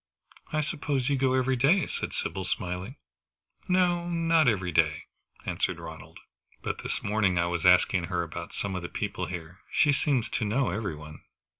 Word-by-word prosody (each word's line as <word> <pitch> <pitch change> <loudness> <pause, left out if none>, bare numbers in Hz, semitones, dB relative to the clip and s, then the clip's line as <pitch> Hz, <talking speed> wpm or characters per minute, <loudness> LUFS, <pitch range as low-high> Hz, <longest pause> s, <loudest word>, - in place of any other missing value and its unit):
"I 155 - +1
suppose 145 -4 -1
you 140 - +3
go 130 -1 +2
every 130 0 +2
day," 145 +9 +4
said - - -4
Sybil, 95 - -3
smiling. 90 +6 -3 0.7
"No 175 -1 +2
not 165 -3 +3
every 95 -6 +1
day," 80 -2 +2 0.4
answered - - -1
Ronald. - - -10 0.5
"But - - -3
this - - -3
morning 100 -3 +2
I 85 - +3
was 85 0 +1
asking 90 0 +5
her 85 -1 -1
about 85 +1 -7
some 100 -1 -3
of 90 - -3
the 85 - -5
people - - -3
here. 90 0 -7
She 150 -5 +4
seems 135 -5 +1
to - - -1
know 120 +4 +1
every 95 -4 -2
one." 75 0 -11
105 Hz, 175 wpm, -28 LUFS, 90-140 Hz, 0.7 s, asking